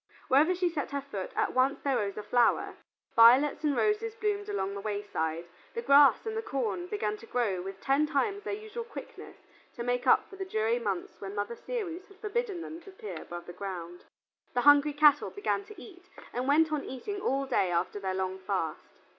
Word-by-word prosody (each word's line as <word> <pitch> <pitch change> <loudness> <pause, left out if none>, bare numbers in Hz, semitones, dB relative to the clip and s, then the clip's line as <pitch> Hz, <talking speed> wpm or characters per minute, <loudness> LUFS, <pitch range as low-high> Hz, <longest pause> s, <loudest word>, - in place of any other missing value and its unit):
Wherever 305 +7 +5
she 360 0 +1
set 320 -4 -3
her 280 0 -3
foot 205 -9 -6
at - - 0
once 260 +2 +2
there 275 -2 +1
rose 200 -1 -2
a 210 - -4
flower: 240 +2 +2 0.4
violets 250 +7 +6
and 295 -2 +1
roses 430 +1 +1
bloomed 415 -1 -2
along 200 - -2
the 200 - -5
wayside; 195 -6 -3 0.3
the 235 - -3
grass 280 - +6
and 445 0 -3
the 445 - -1
corn 215 - -2
began 210 +2 -2
to 230 - -14
grow 220 -8 0
with 195 +1 -7
ten 280 +3 +2
times 395 +8 0
their - - -4
usual 435 +3 -6
quickness 460 - -10 0.4
to 235 - -4
make 245 0 -1
up - - +5
for 390 - -12
the 385 - -3
dreary 230 -8 0
months 200 -6 -4
when 195 0 -6
Mother 205 +3 -2
Ceres 380 - -5
had 395 -2 -18
forbidden 425 -3 -2
them 330 +1 -8
to 390 - -13
appear 210 - -8
above 175 0 -8
ground. 175 -3 -7 0.5
The 245 - +3
hungry 290 +2 +6
cattle 295 0 +5
began 405 0 -2
to 425 0 -12
eat, 365 -3 -14 0.2
and 250 +2 -2
went 310 +3 +4
on 300 -2 -1
eating 400 - -5
all 275 -3 0
day 235 -8 +1
after 175 +4 -1
their 190 -1 -2
long 190 0 -2
fast. 185 -4 -2
270 Hz, 205 wpm, -30 LUFS, -, 0.5 s, violets